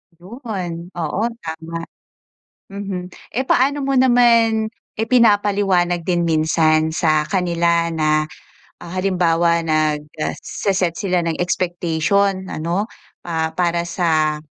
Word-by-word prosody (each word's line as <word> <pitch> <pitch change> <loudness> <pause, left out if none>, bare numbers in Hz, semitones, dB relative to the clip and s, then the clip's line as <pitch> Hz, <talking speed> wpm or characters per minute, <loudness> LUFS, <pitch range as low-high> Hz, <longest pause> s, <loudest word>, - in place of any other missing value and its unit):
'Yon, 180 - -6
oo 175 +3 -2 0.2
tama. 165 +1 -6 0.9
Mhm. 195 -2 -5 0.2
Eh, 260 +4 -1
paano 275 +3 +2
mo 275 - 0
naman, 235 -3 +4 0.2
ipinapaliwanag 205 -6 +2
din 175 -2 +1
minsan 160 0 +2
sa 155 -2 +2
kanila 170 -2 +1
na, 155 -1 +1 0.5
ah 170 - -10
halimbawa 175 -3 +2
nagse-set 155 +4 -1
sila 185 -1 0
ng 165 -1 -1
expectation 180 +2 0
ano, 175 +7 -2 0.4
ah, 160 -2 -1
para 170 0 0
sa 160 -3 0
175 Hz, 100 wpm, -19 LUFS, 160-200 Hz, 0.9 s, naman